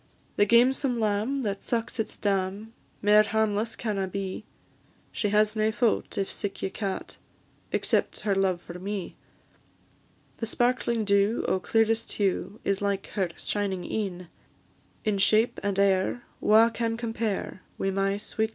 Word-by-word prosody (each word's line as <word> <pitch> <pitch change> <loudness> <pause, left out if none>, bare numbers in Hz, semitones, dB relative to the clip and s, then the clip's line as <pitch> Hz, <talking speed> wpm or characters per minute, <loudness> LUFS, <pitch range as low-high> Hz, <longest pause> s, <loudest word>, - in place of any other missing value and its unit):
The 205 - +3
gamesome 250 +2 +4
lamb 220 +6 0
that 200 -2 -2
sucks 230 0 -2
its 220 - -3
dam, 200 +2 -1 0.3
Mair 210 +1 +7
harmless 220 0 0
canna 200 -4 -2
be; 190 0 -4 0.7
She 210 - -1
has 210 +1 +3
nae 215 0 +2
faut, 235 0 0
if 195 - 0
sic 200 -1 -4
ye 190 - -1
ca't, 195 -1 -4 0.5
Except - - 0
her 210 -1 +1
love 190 -2 +1
for 175 +1 -8
me; 195 0 -4 1.2
The 225 - -3
sparkling 235 -1 +1
dew, 200 +2 +2
o' 190 - +1
clearest 225 +3 +1
hue, 200 +1 -1
Is 200 0 0
like 200 -1 -1
her 190 -4 -1
shining 195 -3 -2
een; 185 -5 -3 0.8
In 210 -2 +1
shape 220 +4 +3
and 200 -1 -1
air 195 +4 +2 0.2
wha 220 +2 +6
can 230 -1 -2
compare, 225 -4 -3 0.2
Wi' 195 - 0
my 195 +1 0
sweet 220 +1 -1
lovely - - -3
Jean. - - -18
210 Hz, 150 wpm, -27 LUFS, 195-225 Hz, 1.2 s, Mair